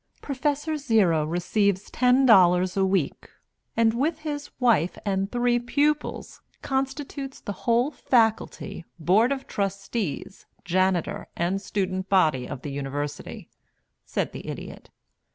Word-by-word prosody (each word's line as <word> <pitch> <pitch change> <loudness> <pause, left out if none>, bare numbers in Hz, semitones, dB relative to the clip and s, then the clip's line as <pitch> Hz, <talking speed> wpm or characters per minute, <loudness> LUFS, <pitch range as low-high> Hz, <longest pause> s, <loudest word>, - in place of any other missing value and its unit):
Prof. 285 +1 -1 0.2
Zero 195 - +3
receives 190 +4 0
ten 255 +2 +4
dollars 185 -5 +5
a 195 - +2
week, 190 -6 0 0.5
and 225 -1 +4
with 305 +6 -1
his 295 -2 -4
wife 215 - +2
and 195 0 -1
three 240 0 +2
pupils 290 +5 -1 0.2
constitutes 270 0 -3
the - - -5 0.2
whole 240 +5 +3
faculty, 225 - 0
board 195 - +3
of 270 -1 -2
trustees, 195 -3 -3 0.2
janitor, 185 -1 0
and 180 +3 0
student 190 -2 -2
body 155 -10 +3
of 130 - -7
the 145 - -4
University," 145 +1 -5 0.6
said - - -2
the - - -9
Idiot. - - -8
200 Hz, 120 wpm, -25 LUFS, 180-255 Hz, 0.6 s, dollars